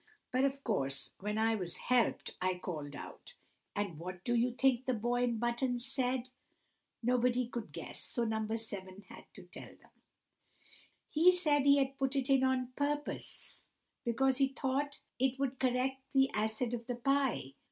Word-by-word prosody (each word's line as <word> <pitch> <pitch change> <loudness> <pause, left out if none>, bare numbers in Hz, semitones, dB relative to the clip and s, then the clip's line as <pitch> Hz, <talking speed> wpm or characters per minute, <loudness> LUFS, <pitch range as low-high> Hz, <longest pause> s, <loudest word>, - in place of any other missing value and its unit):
But, 255 +2 +3
of 275 0 -2
course, 135 - 0
when 210 +2 -2
I 225 +1 +3
was 185 -6 -3
helped 250 -1 +1
I 185 0 +1
called 150 -5 -5
out. - - -10 0.4
And 200 -7 -2
what 180 +1 -7
do 240 - +1
you 240 +1 +3
think 260 -1 +3
the 255 - +1
boy 240 +3 0
in 235 -2 0
buttons 240 +1 0
said?" 255 -1 0 0.7
Nobody 250 +1 +2
could 235 -2 -6
guess, - - -5
so 240 - 0
No. 220 -1 -1
7 200 -4 -4
had - - -11
to - - -10
tell - - -11
them. - - -24 1.2
"He 335 +4 +6
said 300 -6 +3
he 280 0 +7
had 270 0 0
put 270 0 0
it 270 0 +1
in 265 -1 +5
on 255 -1 +1
purpose, 290 +1 -3 0.4
because 260 +2 +2
he 275 -1 +4
thought 270 +2 -2 0.2
it 265 0 +2
would 270 -1 -2
correct 260 +1 +1
the 270 0 +5
acid 220 +3 -1
of 235 -1 -4
the 245 - -2
pie. 265 - +1
250 Hz, 170 wpm, -34 LUFS, 220-270 Hz, 1.2 s, he